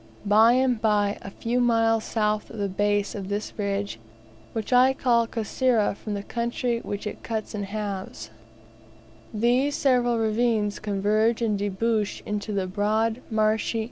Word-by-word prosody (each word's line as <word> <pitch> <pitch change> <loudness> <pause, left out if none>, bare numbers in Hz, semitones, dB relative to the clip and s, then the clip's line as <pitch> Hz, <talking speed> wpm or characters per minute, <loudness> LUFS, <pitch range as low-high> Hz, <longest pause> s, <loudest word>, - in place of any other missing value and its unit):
By 220 +3 +6
and 255 -3 +2
by, 210 -2 +1
a - - -7
few 230 +5 -2
miles 225 -2 +2
south 210 -1 -1
of 225 - -10
the 200 -1 -1
base 205 +1 0
of 195 -2 -6
this 205 +1 -3
ridge 200 - -2 0.5
(which 225 +2 -3
I 255 +2 +6
call 235 -4 +2
Kasera, 230 0 +1
from 210 0 -5
the 200 - -4
country 235 +1 -2
which 205 -2 -5
it 210 - -6
cuts 220 -2 -4
in 205 -2 -3
halves), 195 - -5 1.0
these 245 +6 +1
several 245 -4 +2
ravines 220 -1 +1
converge 215 +3 +1
and 215 -2 +1
debouch 205 +2 -1
into 210 0 -3
the 195 -2 -1
broad, 215 +5 0
[marshy? 220 +1 +1
215 Hz, 150 wpm, -25 LUFS, 205-235 Hz, 1.0 s, By